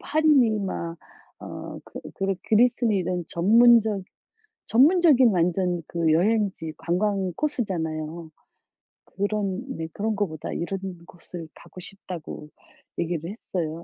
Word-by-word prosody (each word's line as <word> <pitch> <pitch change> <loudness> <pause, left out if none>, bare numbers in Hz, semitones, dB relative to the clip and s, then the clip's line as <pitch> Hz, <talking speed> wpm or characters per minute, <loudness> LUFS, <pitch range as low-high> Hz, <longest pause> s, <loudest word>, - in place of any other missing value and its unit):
파리니 290 -8 +3
막 170 -3 -4 0.4
어 - - -8
그 - - -9
그리 195 0 -1
그리스니 235 -1 +3
이런 180 -1 -2
전문적 220 +2 +5 0.6
전문적인 285 -1 +5
완전 180 -1 +1
그 165 -2 +1
여행지 190 -2 +1
관광 190 +1 0
코스잖아요. 165 - -3 0.8
그런 200 +2 -2
네 160 0 -4
그런 215 +1 -1
거보다 170 -7 -3
"이런 185 +3 -3 0.3
곳을 170 -2 -10
가고 185 - -13
싶다."고 175 -6 -8 0.5
얘기를 170 0 -2
했어요. 170 -6 -4
190 Hz, 245 characters per minute, -25 LUFS, 170-220 Hz, 0.8 s, 전문적